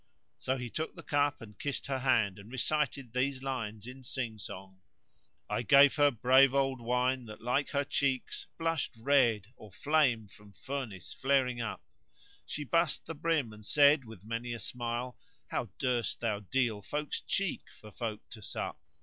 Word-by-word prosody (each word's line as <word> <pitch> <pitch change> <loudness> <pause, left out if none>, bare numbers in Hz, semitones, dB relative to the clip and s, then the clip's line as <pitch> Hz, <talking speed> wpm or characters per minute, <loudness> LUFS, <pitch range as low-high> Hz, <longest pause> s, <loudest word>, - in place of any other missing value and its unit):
So 130 +1 0
he 125 -2 -5
took 160 +1 -3
the - - -10
cup 145 -3 +1
and 105 -2 -13
kissed 145 -1 -2
her 135 -1 -1
hand 115 -7 +2
and 100 +4 -12
recited 135 -2 -1
these 130 +1 0
lines 110 -6 -3
in 130 +2 -9
sing 120 -4 -3
song: 95 -1 -8 0.7
"I - - -1
gave 140 +4 +7
her 145 -1 +6
brave 130 +2 +5
old 135 -2 +1
wine 125 +2 +1
that 110 -1 -9
like 125 +5 0
her 140 -1 +1
cheeks 135 -2 -1
* - - -48
Blushed 165 -5 -1
red 120 -4 +3
or 110 - -13
flame 130 -4 +2
from 100 0 -16
furnace 120 -6 -5
flaring 130 -3 +2
up: 115 - -4 0.6
She 150 - -3
bussed 165 +2 +1
the 165 - -5
brim 155 -7 0
and 105 0 -13
said 145 +4 +5
with 110 -5 -12
many 115 +2 -3
a 120 - -5
smile 120 +2 -3
* - - -37
How - - -1
durst 120 -4 0
thou 110 -3 0
deal 110 0 0
folk's 150 +8 -3
cheek 195 -4 -1
for 105 - -12
folk 110 -1 -5
to 110 - -8
sup? - - -4
125 Hz, 175 wpm, -32 LUFS, 110-140 Hz, 0.7 s, gave